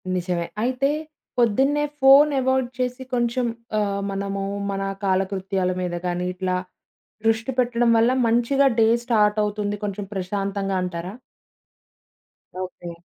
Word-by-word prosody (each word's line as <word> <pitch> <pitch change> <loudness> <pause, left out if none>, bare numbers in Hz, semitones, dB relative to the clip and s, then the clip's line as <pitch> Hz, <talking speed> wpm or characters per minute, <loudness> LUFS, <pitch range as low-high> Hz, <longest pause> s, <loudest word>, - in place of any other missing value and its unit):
నిజమే. 175 -1 -1 0.2
అయితే 255 +3 +1 0.5
పొద్దున్నే 265 +6 +3 0.2
ఫోను 280 +2 +7
అవాయిడ్ 260 -1 +1
చేసి, 250 +1 -2
కొంచెం 240 +1 +1 0.3
ఆహ్, 200 -1 -1
మనము 195 0 -3 0.3
మన 195 0 -3 0.2
కాలకృత్యాల 190 -1 0
మీద 175 -1 -2
గాని 180 0 -1
ఇట్లా 185 0 -2 0.7
దృష్టి 225 +2 +2
పెట్టడం 240 -1 +2
వల్ల 230 +2 +4 0.2
మంచిగా 240 +4 +3
డే 225 - +6 0.2
స్టార్టవుతుంది 210 -2 +1
కొంచెం 205 0 -3
ప్రశాంతంగా 195 0 -2
అంటారా? 180 0 -4 1.5
ఓకే. 180 -2 -6
210 Hz, 110 wpm, -23 LUFS, 190-245 Hz, 1.5 s, ఫోను